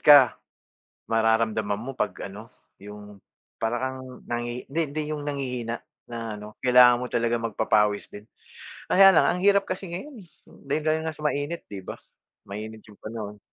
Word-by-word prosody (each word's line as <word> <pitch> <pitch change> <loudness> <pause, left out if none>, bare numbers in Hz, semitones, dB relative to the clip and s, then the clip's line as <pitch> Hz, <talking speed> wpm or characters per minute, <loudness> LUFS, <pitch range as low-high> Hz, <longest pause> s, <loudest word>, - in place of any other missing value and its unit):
ka, 145 - +10 0.9
mararamdaman 110 -2 +1
mo 130 - -5
'pag - - 0 0.2
ano, 105 +3 -10 0.3
yung 105 0 -11 0.4
para 115 +2 0
kang 130 -1 -6
nanghi 120 +1 -3
hindi 160 +4 0
hindi 155 +2 -2
yung 150 -1 -3
nanghihina 125 -5 -3 0.2
na 115 -2 -5
ano, 105 +1 -10
kailangan 125 -1 +7
mo - - -2
talagang 120 0 0
magpapawis 105 -1 +1
din. 105 - -10 0.6
Kaya 195 +1 +8
lang - - +5
ang 180 - +1
hirap 200 0 +4
kasi 185 -1 -4
ngayon 270 - -6
eh, 175 - -18 0.3
dahil 155 +3 0
nga 160 0 -3
sa 150 0 -3
mainit 150 +3 -2
'di 100 -2 -8
ba? - - -7 0.5
Mainit 110 +2 -7
yung 105 -1 -16
panahon. 105 -2 -6
120 Hz, 160 wpm, -26 LUFS, 110-145 Hz, 0.9 s, ka